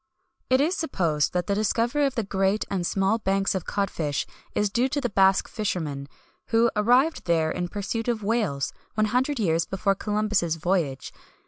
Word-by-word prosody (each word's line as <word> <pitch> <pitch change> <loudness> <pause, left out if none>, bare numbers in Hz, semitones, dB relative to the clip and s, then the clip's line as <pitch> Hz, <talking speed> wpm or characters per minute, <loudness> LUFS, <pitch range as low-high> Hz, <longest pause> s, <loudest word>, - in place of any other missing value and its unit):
[XXI - - -19
158] 275 +3 +4
It - - +2
is 360 - -1
supposed 165 - 0
that 180 -1 0
the 200 - 0
discovery 235 +7 +1
of 270 - -5
the 230 - 0
great 195 +1 0
and 180 -3 -1
small 195 +3 +1
banks 195 -1 +1
of 190 -3 -3
cod 200 -1 -1
fish 145 -4 -2 0.3
is 205 -1 +1
due 245 +4 +1
to 290 - -1
the 245 -5 -2
Basque 195 -1 +4
fishermen, 155 - -3 0.4
who 230 +1 +3
arrived 250 +9 +3
there 160 -2 +2
in 175 0 -2
pursuit 205 +4 -4
of 230 -3 -1
whales, 200 -11 0 0.2
one 215 0 +2
hundred 255 +6 0
years 165 -5 +1
before 195 +1 +1
Columbus' 210 -4 0
voyage. 160 -6 -1
200 Hz, 190 wpm, -25 LUFS, 175-230 Hz, 0.4 s, 158